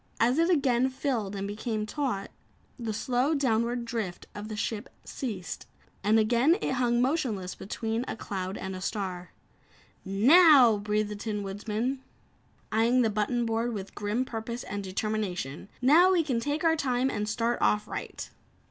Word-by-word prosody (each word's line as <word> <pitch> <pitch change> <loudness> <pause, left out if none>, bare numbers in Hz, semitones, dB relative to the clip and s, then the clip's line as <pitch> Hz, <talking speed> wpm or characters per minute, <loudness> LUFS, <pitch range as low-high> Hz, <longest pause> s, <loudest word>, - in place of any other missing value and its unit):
As 245 +6 +3
it 335 +2 +3
again 265 -6 +3
filled 245 -7 -2
and 200 0 -3
became 215 +1 -3
taut, 225 -5 -3 0.5
the 230 -2 -3
slow 250 +7 0
downward 240 -3 0
drift 225 -7 -4
of 205 +1 -7
the 215 - -5
ship 210 +2 -3 0.2
ceased, 210 - -5 0.4
and 210 +3 +4
again 240 - +4
it - - -1
hung 245 -2 +2
motionless 250 - -1
between 225 +3 -3
a - - -3
cloud 190 -2 -4
and 190 0 -5
a 185 - -7
star. 185 -3 -4 0.7
"Now!" 250 - +6
breathed 210 0 0
the 210 - -5
Tin 210 0 -3
Woodman 215 +6 -3 0.7
eyeing 235 +3 +3
the 220 - +1
button 225 +3 0
board 230 +1 -1
with 195 -1 -6
grim 210 +5 -1
purpose 235 0 -5
and 205 0 -5
determination, 190 -6 -3
"Now 340 +8 +6
we 345 -3 +3
can 260 -6 0
take 290 +6 -2
our 325 -1 +4
time 260 -3 0
and 210 0 -2
start 230 +2 0
off 210 0 +2
right." - - -6
225 Hz, 160 wpm, -28 LUFS, 205-255 Hz, 0.7 s, Now